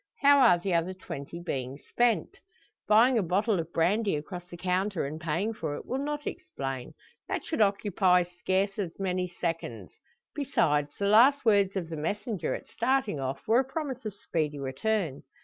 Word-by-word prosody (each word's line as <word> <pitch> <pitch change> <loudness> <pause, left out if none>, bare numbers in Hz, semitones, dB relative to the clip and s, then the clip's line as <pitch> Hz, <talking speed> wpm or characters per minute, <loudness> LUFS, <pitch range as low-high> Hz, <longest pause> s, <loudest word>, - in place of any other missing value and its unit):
How 285 0 +7
are 235 -9 +6
the 180 +1 -2
other 170 +2 0
twenty 170 -2 -7
being 135 -6 -4
spent? 240 - 0 0.5
Buying 230 +3 +5
a - - +2
bottle 195 +3 +1
of 165 0 -5
brandy 195 +4 +2
across 175 +4 -7
the 175 - -9
counter, 185 0 0
and 155 +3 -6
paying 170 +7 -1
for 160 -8 -4
it, - - -8
will 265 +2 -2
not 295 0 -3
explain; 135 -2 -5 0.3
that - - -2
should 315 - -1
occupy 195 -3 +3
scarce 190 +3 -1
as 180 -5 -3
many 185 -1 -1
seconds. 170 -1 -4 0.4
Besides, 150 - +1
the 200 - -1
last 250 +7 +6
words 200 -3 +4
of 180 -4 -2
the 160 - -5
messenger, 205 +6 -2
at - - -9
starting 235 - 0
off, 135 +1 -4
were 225 +3 +5
a - - +3
promise 270 -2 -5
of 215 -3 -5
speedy 155 -6 -2
return. 145 +3 -2
190 Hz, 175 wpm, -28 LUFS, 165-220 Hz, 0.5 s, How